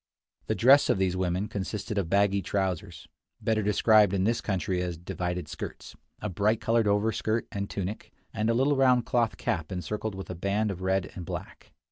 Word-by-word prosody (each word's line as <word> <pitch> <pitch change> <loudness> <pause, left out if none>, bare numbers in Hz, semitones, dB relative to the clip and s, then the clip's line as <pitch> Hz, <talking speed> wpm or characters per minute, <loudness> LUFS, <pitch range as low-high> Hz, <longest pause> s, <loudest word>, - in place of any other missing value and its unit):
The - - 0
dress 135 +4 +6
of - - +3
these 95 -1 +1
women 90 +2 -1
consisted 105 +1 -3
of 85 -4 -2
baggy 100 0 +3
trousers, 95 -3 -3 0.3
better 110 -1 +1
described 105 -1 +4
in 95 - +1
this 115 +3 +1
country 95 -2 -1
as 90 -2 -3
"divided 90 +1 -4
skirts," - - -8 0.3
a - - 0
bright 105 +3 +1
colored 115 -1 +2
overskirt 110 +2 +1
and 100 0 -4
tunic, 100 +2 -5 0.2
and 110 +2 0
a 115 - +2
little 135 +4 +3
round 125 -3 +4
cloth 120 -2 +1
cap 85 -3 -2
encircled 95 +4 -3
with 95 -1 -7
a - - -3
band 100 +4 0
of 95 -1 -7
red 95 0 0
and 90 - -7
black. - - -8
100 Hz, 185 wpm, -28 LUFS, 95-110 Hz, 0.3 s, dress